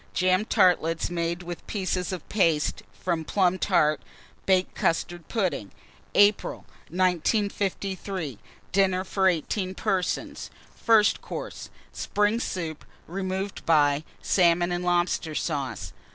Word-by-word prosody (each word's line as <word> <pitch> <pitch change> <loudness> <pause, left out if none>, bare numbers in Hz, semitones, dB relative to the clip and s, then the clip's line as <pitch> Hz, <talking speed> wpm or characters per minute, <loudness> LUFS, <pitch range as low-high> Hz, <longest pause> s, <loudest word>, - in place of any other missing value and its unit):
Jam 185 +2 +3
tartlets 165 -5 +2
made 170 +1 -2
with 175 -1 -7
pieces 185 -3 -2
of 185 - -6
paste 165 -7 +1
from 170 -3 -2
plum 185 +1 +1
tart, 155 -6 +2 0.5
baked 185 -1 +3
custard 170 0 -1
pudding. 185 - -1 0.4
APRIL. 205 0 +3 0.2
1953. 185 - -1 0.3
DINNER 190 -1 +2
FOR 190 0 +1
18 185 +2 0
PERSONS. 185 -1 -2 0.3
First 220 -2 +4
Course. - - -7 0.2
Spring 210 +2 +1
Soup, 165 -9 -4 0.2
removed 190 +2 -4
by 145 -2 +4 0.2
Salmon 175 -1 +3
and 175 0 -1
Lobster 175 -3 0
Sauce. 130 - -3
180 Hz, 110 wpm, -26 LUFS, 165-190 Hz, 0.5 s, First